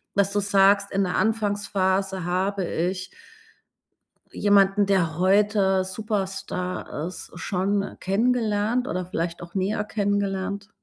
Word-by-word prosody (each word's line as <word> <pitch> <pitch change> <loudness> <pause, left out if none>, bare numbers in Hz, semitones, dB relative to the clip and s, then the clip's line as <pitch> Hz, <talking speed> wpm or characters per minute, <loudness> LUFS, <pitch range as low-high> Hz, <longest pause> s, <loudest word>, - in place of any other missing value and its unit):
dass 200 0 +2
du 205 - +2
sagst, 200 0 +3
in 195 0 +1
der 180 -1 -1
Anfangsphase 200 -3 0
habe 190 +2 -1
ich 185 +2 -2 1.2
jemanden, 200 0 +4
der 175 -5 +1
heute 195 0 +3
Superstar 190 -5 -3
ist, 185 - -8
schon 195 +3 -1
kennengelernt 225 +3 +1
oder 185 0 -2
vielleicht 170 -1 -3
auch 170 +1 -11
näher 200 +2 0
kennengelernt? 200 -1 -2
195 Hz, 110 wpm, -24 LUFS, 185-205 Hz, 1.2 s, jemanden